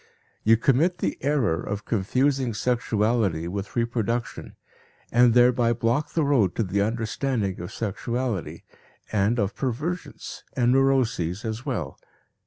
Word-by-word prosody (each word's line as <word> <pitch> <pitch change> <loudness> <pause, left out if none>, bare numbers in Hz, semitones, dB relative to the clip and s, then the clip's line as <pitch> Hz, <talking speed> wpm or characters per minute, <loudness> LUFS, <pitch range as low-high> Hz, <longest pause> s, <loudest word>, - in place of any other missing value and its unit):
You 115 +1 +5
commit 150 +10 +2
the - - -1
error 130 - +1
of 100 +1 -5
confusing 125 +3 0
sexuality 110 -7 0
with 100 +2 -5
reproduction 115 0 -2 0.6
and 120 0 +5
thereby 120 -1 +4
block 120 +6 -1
the 165 - +2
road 125 -11 +2
to 115 - +1
the 100 +1 0
understanding 110 -1 -1
of 90 +3 -6
sexuality, 115 0 -3 0.5
and 105 +3 +2
of 100 -3 0
perversions 150 +8 -4
and 120 -1 +2
neuroses 125 -9 +1
as 110 +5 -4
well. 85 - -3
115 Hz, 125 wpm, -25 LUFS, 105-130 Hz, 0.6 s, You